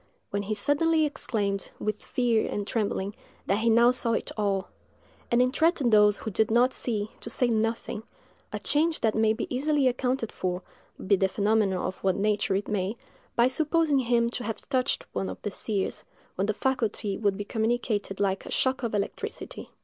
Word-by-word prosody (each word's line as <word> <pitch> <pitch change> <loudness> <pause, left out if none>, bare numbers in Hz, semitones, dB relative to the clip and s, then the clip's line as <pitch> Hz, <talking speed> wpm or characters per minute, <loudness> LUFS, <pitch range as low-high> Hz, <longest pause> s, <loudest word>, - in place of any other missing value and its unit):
—when 200 - 0
he 205 +2 -2
suddenly 310 +7 +3
exclaimed, 205 -9 -2
with 215 -1 -3
fear 240 -3 +1
and 205 - -2
trembling, 200 -2 -1 0.3
that 200 - +1
he 230 +1 +2
now 235 +2 +6
saw 240 -2 0
it - - -2
all; 200 -3 0 0.6
and 240 +1 +4
entreated 275 0 +2
those 210 -1 +6
who 220 - -5
did 215 +3 +2
not 245 +3 +4
see, 215 -3 -2
to - - -7
say 250 - +1
nothing—a 225 -1 -4
change 315 +2 +2
that 220 -1 +2
may 220 0 +3
be 220 +2 -2
easily 285 0 +2
accounted 250 -2 0
for, 180 0 -3 0.4
be 200 - +5
the 190 0 +2
phenomenon 205 -1 +1
of 185 - -5
what 190 -2 +2
nature 205 -1 +1
it 200 - -1
may, 205 +1 -1 0.4
by 240 +1 +5
supposing 300 +1 +2
him 235 -2 +2
to 245 - -4
have 220 0 -5
touched 260 -2 0
one 190 - -2
of - - -7
the 205 - -2
seers, 200 0 -3 0.3
when 195 +2 -1
the 215 - +1
faculty 225 -6 -1
would 200 -1 0
be 205 - -3
communicated 220 -3 -1
like 195 -1 0
a - - -9
shock 260 0 +1
of 235 -3 -2
electricity. 200 0 -4
220 Hz, 180 wpm, -27 LUFS, 205-250 Hz, 0.6 s, now